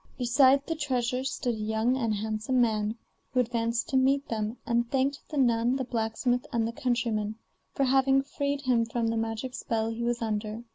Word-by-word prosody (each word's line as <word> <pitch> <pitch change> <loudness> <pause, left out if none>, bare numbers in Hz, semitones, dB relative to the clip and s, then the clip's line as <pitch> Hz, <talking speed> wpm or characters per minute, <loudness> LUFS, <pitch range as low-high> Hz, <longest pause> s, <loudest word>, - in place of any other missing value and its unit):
Beside 265 +2 +4
the 325 - -1
treasure 255 -4 -1
stood 260 -2 -2
a - - -5
young 220 +3 +1
and 230 -5 0
handsome 215 +4 -1
man, 220 -2 +1 0.3
who 255 - 0
advanced 235 0 0
to 270 - +2
meet, 275 +2 +2
them, 220 +1 -2
and 235 0 +1
thanked 275 +2 0
the 300 - -4
nun, 240 -1 +3
the 265 - -1
blacksmith, 245 +1 -1
and 230 -1 +1
the - - -3
countryman, 235 -6 -1 0.4
for 275 - +1
having 270 +1 +3
freed 280 0 -2
him 250 -4 +2
from 230 0 -1
the 230 - -1
magic 225 +3 -3
spell 225 -2 -2
he 225 +1 -5
was 240 0 0
under. 215 0 -3
240 Hz, 190 wpm, -28 LUFS, 225-265 Hz, 0.4 s, Beside